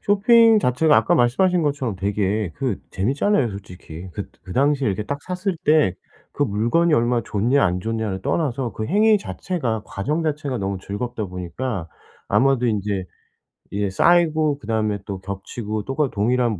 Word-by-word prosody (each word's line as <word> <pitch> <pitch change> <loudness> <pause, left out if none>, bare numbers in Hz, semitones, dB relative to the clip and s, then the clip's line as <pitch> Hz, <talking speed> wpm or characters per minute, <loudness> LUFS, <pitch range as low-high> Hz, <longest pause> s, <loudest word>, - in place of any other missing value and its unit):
쇼핑 225 +2 +5
자체가 150 -1 +3
아까 175 - +3
말씀하신 170 +7 +3
것처럼 140 -8 -1
되게 100 0 -1
그 135 -3 -2
재밌잖아요 135 - +1
솔직히. 90 -3 -9
긋 100 +1 -6
그 90 - -9
당시에 140 +2 +2
이렇게 100 0 -1
딱 145 +5 -3
샀을 185 0 -3
때 150 - +4 0.4
그 145 - 0
물건이 125 +10 +2
얼마 120 -1 +2
좋냐 120 +7 +1
안 90 +1 0
좋냐를 110 -3 -3
떠나서 130 - -1
그 110 - -4
행위 210 - +4
자체가 130 - -3
과정 150 +12 -2
자체가 145 -4 -2
너무 95 -1 -2
즐겁다 110 +4 -4
보니까 90 +2 -5 0.4
아마도 135 -2 +3
인제 100 -3 -1 0.7
이게 100 0 -1
쌓이고 155 - +3
그다음에 110 -2 -1
또 100 -2 -5
겹치고 105 +2 -5
똑같 135 +1 -1
동일한 115 -1 +1
120 Hz, 340 characters per minute, -22 LUFS, 100-150 Hz, 0.7 s, 쇼핑